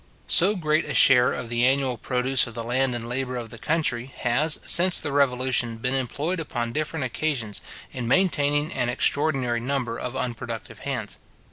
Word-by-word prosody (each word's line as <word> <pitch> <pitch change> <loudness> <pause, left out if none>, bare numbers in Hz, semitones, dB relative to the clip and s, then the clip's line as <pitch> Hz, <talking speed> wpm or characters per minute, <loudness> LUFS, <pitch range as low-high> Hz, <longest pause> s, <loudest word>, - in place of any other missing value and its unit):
So 195 +5 +4
great 155 -3 0
a - - -5
share 125 -1 +6
of 125 - -5
the 120 +1 -1
annual 130 0 +2
produce 125 +2 +1
of 120 - -10
the 115 - -4
land 125 +2 0
and 115 -1 -5
labour 125 +1 -3
of 115 -2 -7
the 115 - -10
country, 150 -6 -1
has, 150 +6 +2
since 180 +1 +6
the 145 - -4
Revolution, 130 -4 +1
been 125 +3 -2
employed 145 +7 -2
upon 120 -7 -4
different 155 -1 -2
occasions, 125 -5 -3 0.3
in 125 -2 -5
maintaining 145 0 +1
an 120 - -1
extraordinary 130 -2 0
number 125 -2 -3
of 125 +1 -5
unproductive 125 -3 -5
hands. - - -5
130 Hz, 170 wpm, -24 LUFS, 120-145 Hz, 0.3 s, share